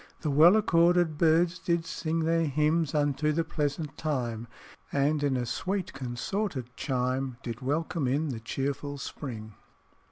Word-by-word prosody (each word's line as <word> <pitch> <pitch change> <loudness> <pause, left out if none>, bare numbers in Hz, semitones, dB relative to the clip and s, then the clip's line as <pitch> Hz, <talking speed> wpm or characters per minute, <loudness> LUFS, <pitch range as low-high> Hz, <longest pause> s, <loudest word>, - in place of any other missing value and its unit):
"The 150 - -1
well 160 +7 +7
accorded 175 -5 +3
birds 170 +2 +3
did 170 -1 0
sing 165 -1 -2
Their 165 +1 +2
hymns 150 +2 +1
unto 145 +1 +1
the 165 +2 +1
pleasant 150 -2 -3
time, 120 -7 -2 0.4
And 145 +2 +1
in 140 -3 +1
a 125 - -1
sweet 190 +9 -2
consorted 130 - -3
chime, 130 -1 -1
Did 115 0 -5
welcome 150 +2 -1
in 145 +4 0
the 120 -4 -4
cheerful 140 +4 -3
spring." 115 -6 -7
150 Hz, 140 wpm, -28 LUFS, 130-165 Hz, 0.4 s, well